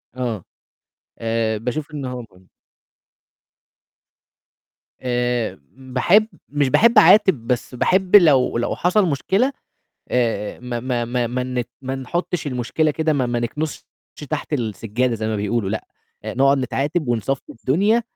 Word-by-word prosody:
آه. 120 -7 -3 0.8
آآ 115 -1 0
باشوف 140 +6 -4
إن 140 -3 -4
هو 125 -1 -5
مهم. 90 0 -22 2.5
آآ 120 -6 -1 0.2
باحب 135 +12 +2 0.2
مش 145 -1 +1
باحب 230 - +4
أعاتب، 190 - +6
بس 125 0 -2
باحب 185 +8 +2
لو 145 -11 +5
لو 120 - -1
حصل 185 +3 +2
مشكلة، 195 - +1 0.6
آآ 115 -4 -1
ما 120 -1 -4
ما 120 -1 -1
ما 120 0 -1
ما 125 +2 -2
نت 125 -1 -3
ما 130 +1 -3
نحُطّش 155 +4 -3
المشكلة 135 +4 0
كده 160 +1 0
ما 130 -4 +1
ما 120 0 -1
نكنسش 150 +6 -4 0.5
تحت 155 0 -3
السجادة 115 0 -1
زي 110 -1 -3
ما 110 - -1
بيقولوا 105 0 -1
لأ، 110 - -4 0.4
آآ - - -4
نقعُد 135 +2 +4
نتعاتب 135 +4 -1
ونصفّي 120 +3 -2
الدنيا 205 - +2
125 Hz, 135 wpm, -21 LUFS, 120-150 Hz, 2.5 s, أعاتب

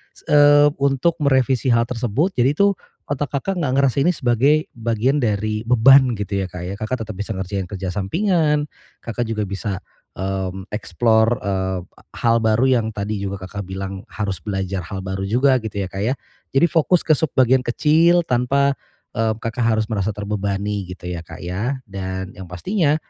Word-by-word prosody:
s - - -18
eee 145 0 +6
untuk 140 +4 +1
merevisi 130 -3 +2
hal 115 0 +4
tersebut. 125 - 0
Jadi 125 +3 +3
itu 200 +5 +4 0.4
otak 145 0 -3
Kakak 185 +7 -2
nggak 140 -6 0
ngerasa 140 -2 +2
ini 165 +6 +4
sebagai 140 +5 +2
bagian 120 +4 0
dari 110 -3 0
beban 125 +1 +6
gitu 100 -1 -3
ya, 95 - -1
Kak, 90 -1 -8
ya. 90 +2 -4
Kakak 110 +2 -3
tetep 110 - -7
bisa 105 +1 -3
ngerjain 95 0 -3
kerja 95 0 -5
sampingan, 150 - +1 0.4
Kakak 115 +1 -3
juga 110 -1 -2
bisa, 100 -1 -4 0.3
mmm, 95 0 -4
explore, 110 +3 +2
eee, 95 -2 -1 0.4
hal 115 0 +2
baru 110 +1 +2 0.2
yang 110 - -3
tadi 105 +1 -3
juga 100 0 -3
Kakak 100 0 -6
bilang 95 +1 -6
harus 100 -4 -4
belajar 95 +1 -3
hal 95 -1 -5
baru 95 +1 -3
juga 130 +4 +3
gitu 105 -3 -4
ya, 95 - -6
Kak, 95 - -6
ya. 115 +7 0 0.4
Jadi 135 - +4
fokus 170 +2 +3
ke - - +1
sub-bagian 130 -4 +3
kecil, 165 +7 +3
tanpa, 140 +1 +2 0.4
eee, 110 -2 0
Kakak 115 +1 -1
harus 110 0 0
merasa 100 -1 -1
terbebani 100 -1 -2
gitu 90 0 -10
ya, 90 -1 -4
Kak, 80 - -10
ya. 110 +10 -3
Dan 95 -2 -5
yang 95 -1 -8
pastinya, 150 - 0
110 Hz, 175 wpm, -21 LUFS, 95-135 Hz, 0.4 s, eee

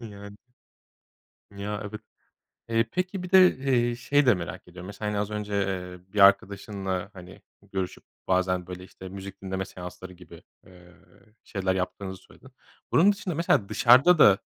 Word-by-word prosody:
E, 115 - -10
yani. 100 0 -11 1.2
Ya, 105 +1 -4
evet. 110 - -8 0.7
Eee, 115 0 +2
peki 180 +1 -2
bir 180 - -8
de, 185 -1 +7
eee, 120 -3 +1
şeyi 145 +4 +2
de 125 - +6
merak 90 0 -6
ediyorum. 90 +1 -10
Mesela 105 +1 -5
yani 105 - -2
az 105 +1 -3
önce, 105 -1 -4
eee, 95 -1 -4
bir 105 - -1
arkadaşınla 100 -1 +2
hani 90 -1 -13 0.3
görüşüp 95 -2 -4 0.2
bazen 90 -1 +1
böyle, 90 0 -8
işte, 95 0 -11
müzik 100 0 -9
dinleme 95 0 -3
seansları 90 0 -10
gibi, 90 -2 -15 0.2
eee, 90 -1 -17 0.5
şeyler 95 -3 -2
yaptığınızı 95 0 -4
söyledin. 130 - -18 0.4
Bunun 190 +5 +6
dışında 200 -4 -4
mesela 145 -11 +1
dışarıda 130 - +6
da, 100 -8 +7
100 Hz, 155 wpm, -26 LUFS, 95-115 Hz, 1.2 s, de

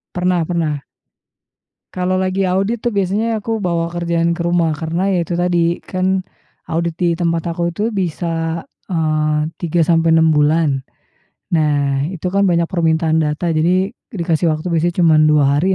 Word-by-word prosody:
Pernah 180 -2 +1
pernah. 155 -5 -2 1.1
Kalau 185 0 0
lagi 190 +1 0
audit 195 +5 0
tuh 240 -2 -1
biasanya 210 +4 0
aku 225 +1 -3
bawa 170 -2 -1
kerjaan 170 -1 0
ke 170 - -5
rumah. 170 -2 +2
Karena 165 +6 -2
ya 180 - +1
itu 175 - -4
tadi 175 -1 +1
kan, 185 0 -1 0.4
audit 170 0 -2
di 180 - +1
tempat 170 0 -1
aku 170 0 -1
itu 205 - -3
bisa, 165 -3 -2 0.3
eee, 155 -2 0
3 170 0 +1
sampai 165 0 +3
6 160 -1 +4
bulan. 150 -2 +2 0.7
Nah 145 -4 +1
itu 180 -1 -6
kan 200 +1 +2
banyak 170 -1 +2
permintaan 160 -2 +1
data, 155 +3 -1
jadi 180 +5 +1 0.2
dikasih 170 - 0
waktu 155 +2 -3
biasanya 170 +1 0
cuman 155 -2 +5
2 150 -1 +4
hari 190 +4 +2
170 Hz, 155 wpm, -18 LUFS, 160-185 Hz, 1.1 s, cuman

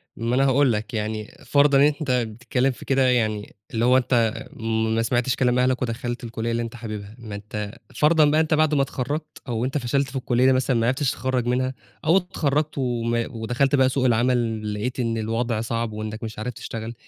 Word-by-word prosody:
ما 115 +2 -1
أنا 135 +1 +3
هاقُول 135 -1 +4
لك 110 +4 -4
يعني 110 +1 -3
فرضًا 145 -1 +4
إن 135 - +6 0.2
أنت 140 -4 -1
بتتكلّم 125 +2 0
في 125 - -11
كده 135 -1 +3
يعني 110 -4 0 0.2
اللي 115 0 +1
هو 125 +1 +5
أنت 120 -3 +2 0.6
ما 115 - +2
سمعتش 120 +2 +1
كلام 125 -1 +2
أهلك 125 0 +2
ودخلت 120 0 -3
الكُلية 115 0 -3
اللي 115 0 0
أنت 115 0 -5
حاببها، 105 -2 -7
ما 110 -3 -7
أنت 105 0 -5 0.2
فرضًا 155 0 +5
بقى 150 +2 +4
أنت 160 0 0
بعد 155 0 +3
ما 140 - +3
اتخرّجت 145 +3 -4
أو 120 -1 -1
أنت 135 +3 -1
فشلت 135 +2 0
في 135 - -11
الكلية 130 0 +3
مثلًا 130 0 +2
ما 115 - +1
عرفتش 130 +1 +1
تتخرّج 130 -2 -1
منها، 130 +1 0 0.3
أو 165 +4 +5
اتخرّجت 155 -5 -1
وما 120 -2 0
ودخلت 120 +4 0
بقى 130 -1 +4
سوق 130 0 0
العمل 115 -3 +1
لقيت 120 +5 -3
إن 115 -2 0
الوضع 115 +1 -1
صعب 115 0 -2
وإنك 110 +1 -5
مش 110 -1 -6
عارف 125 +3 -3
تشتغل، 115 +1 -6
125 Hz, 200 wpm, -24 LUFS, 115-135 Hz, 0.6 s, إن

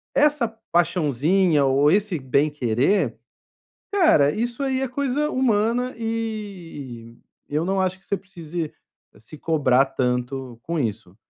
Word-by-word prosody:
essa 295 -5 +3 0.2
paixãozinha 165 -1 +2
ou 135 +2 +4
esse 195 -4 +1
bem 140 +3 +2
querer, 135 - +1 0.8
cara, 235 - +5
isso 240 - -2
aí 265 -1 0
é 265 - 0
coisa 280 +3 -1
humana 245 -1 +1
e 195 - -5 0.3
eu 150 +2 0
não 195 +1 0
acho 185 0 -1
que - - -30
você 200 - -1
precise 170 -4 -6 0.5
se 130 +8 -13
cobrar 140 -5 +3
tanto 125 -1 -2
com 170 -1 -2
isso. 110 -7 -3
170 Hz, 130 wpm, -23 LUFS, 135-225 Hz, 0.8 s, cara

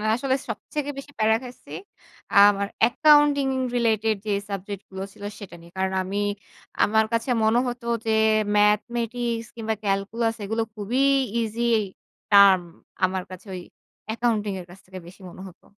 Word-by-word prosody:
আসলে 265 +1 0
সবথেকে 290 +7 -4
বেশি 280 +1 -9
প্যারা 220 +1 +4
খাইছি, 250 0 -12 0.6
আ - - -1 0.2
আমার 200 0 -3 0.2
accounting 290 0 +4 0.3
related 220 -2 +1
যে 210 - -2 0.2
সাবজেক্টগুলো 195 -1 -6
ছিল 205 - -14 0.2
সেটা 190 -4 -10
নিয়ে। 170 0 -16
কারণ 190 0 -1
আমি 195 +2 -4 0.7
আমার 220 +1 +3
কাছে 230 +3 -1
মনে 220 +2 +3
হতো 245 0 -5 0.2
যে, 220 - +1 0.4
mathematics 230 +2 +1
কিংবা 220 -1 -2
calculus 215 +4 -1
এগুলো 225 +3 -1
খুবই 220 +6 -1 0.4
easy 225 +1 -3 0.7
term। 200 -2 +8 0.5
আমার 185 0 -2
কাছে 185 +3 -10
ওই 180 - -5 0.5
accounting 215 -4 -1
এর 175 - -9
কাছ 185 +2 -14
থেকে 185 0 -11
বেশি 185 +2 -15
মনে 185 - -12
হতো। 180 - -22
220 Hz, 145 wpm, -24 LUFS, 195-235 Hz, 0.7 s, term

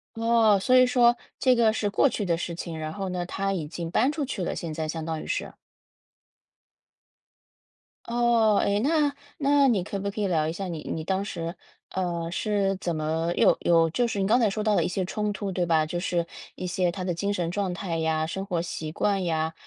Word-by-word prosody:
哦， 225 -2 +4
所 255 +7 +3
以 255 0 +7
说 240 -1 +4 0.2
这 255 -2 +4
个 225 -2 +4
是 210 -1 -1
过 255 +7 +3
去 205 - -3
的 170 -2 +1
事 170 0 -4
情， 165 -1 -6
然 155 0 -4
后 195 -2 -4
呢， 180 -1 -3
她 195 +2 -2
已 160 -5 -3
经 165 +1 -5
搬 255 +9 +3
出 295 -2 -2
去 200 -8 -4
了 - - -2
现 165 -2 -5
在， 155 0 -3
相 160 0 -4
当 160 -1 -3
于 - - -9
是。 - - -3 2.5
哦， 235 -2 +3
哎， 200 +1 +1
那 290 +2 +2 0.2
那 280 -1 +4
你 210 -7 +2
可 200 +1 -4
不 200 +1 -2
可 210 +1 -4
以 200 - +1
聊 160 -4 +1
一 160 - -2
下 195 +1 -4
你 165 -3 -5
你 160 - -3
当 190 +3 -1
时， 170 -3 -5 0.4
呃， 170 -3 -2
是 195 0 0
怎 175 -3 -2
么 160 +2 -1
有 - - +5
有 165 -1 +3
就 240 +9 +1
是 205 -3 -3
你 195 - +1
刚 230 +5 +4
才 225 -4 +3
说 210 +2 -3
到 215 -2 +2
的 - - +3
一 - - 0
些 185 +1 -2
冲 210 +3 -2
突 200 -1 -4
对 180 -1 0
吧？ 160 -2 +3
就 175 +3 -3
是 175 -2 -1 0.3
一 185 - -5
些 180 0 0
她 185 0 -5
的 180 -1 -1
精 200 +4 -1
神 175 -3 -2
状 195 -2 -1
态 175 -2 -3
呀、 160 -1 0
生 190 +4 -4
活 175 -4 -1
习 160 -2 -5
惯 195 +2 0
呀， 160 -1 -1
190 Hz, 245 characters per minute, -26 LUFS, 170-215 Hz, 2.5 s, 以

